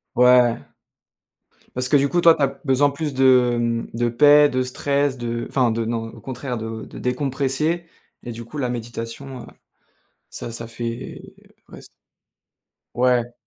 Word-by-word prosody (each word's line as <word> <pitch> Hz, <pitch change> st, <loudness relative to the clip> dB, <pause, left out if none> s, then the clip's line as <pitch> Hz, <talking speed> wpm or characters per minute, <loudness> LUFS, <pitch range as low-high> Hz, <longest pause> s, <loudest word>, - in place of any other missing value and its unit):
Ouais. 125 Hz, -1 st, +5 dB, 1.1 s
Parce 125 Hz, 0 st, -2 dB
que 145 Hz, -, +5 dB
du 140 Hz, 0 st, +2 dB
coup, 175 Hz, +5 st, +1 dB
toi, 165 Hz, -1 st, +7 dB
tu 150 Hz, -, -1 dB
as -, -, +4 dB, 0.2 s
besoin 140 Hz, +1 st, +3 dB
plus 145 Hz, 0 st, -4 dB
de, 130 Hz, -2 st, +5 dB
hem, 115 Hz, -1 st, -1 dB
de 120 Hz, +1 st, +1 dB
paix, 145 Hz, +5 st, +6 dB
de 130 Hz, -2 st, -1 dB
stress, 140 Hz, +2 st, -1 dB
de 120 Hz, -1 st, -4 dB
enfin 125 Hz, -4 st, +2 dB
de 115 Hz, 0 st, -2 dB
non, 115 Hz, 0 st, -2 dB
au -, -, -13 dB
contraire, 125 Hz, -1 st, -5 dB
de 110 Hz, 0 st, -6 dB
décompresser 140 Hz, +5 st, -1 dB, 0.4 s
et 120 Hz, -, -7 dB
du 115 Hz, 0 st, -8 dB
coup, 150 Hz, +6 st, -8 dB
la 125 Hz, -3 st, -1 dB
méditation, 120 Hz, +2 st, -6 dB
heu, -, -, -12 dB, 0.8 s
ça 115 Hz, -, -7 dB
ça 115 Hz, 0 st, -6 dB
fait 115 Hz, +1 st, -6 dB, 0.5 s
ouais, -, -, -11 dB
c -, -, -14 dB, 1.1 s
Ouais. 120 Hz, 0 st, +1 dB
125 Hz, 160 wpm, -22 LUFS, 115-140 Hz, 1.1 s, toi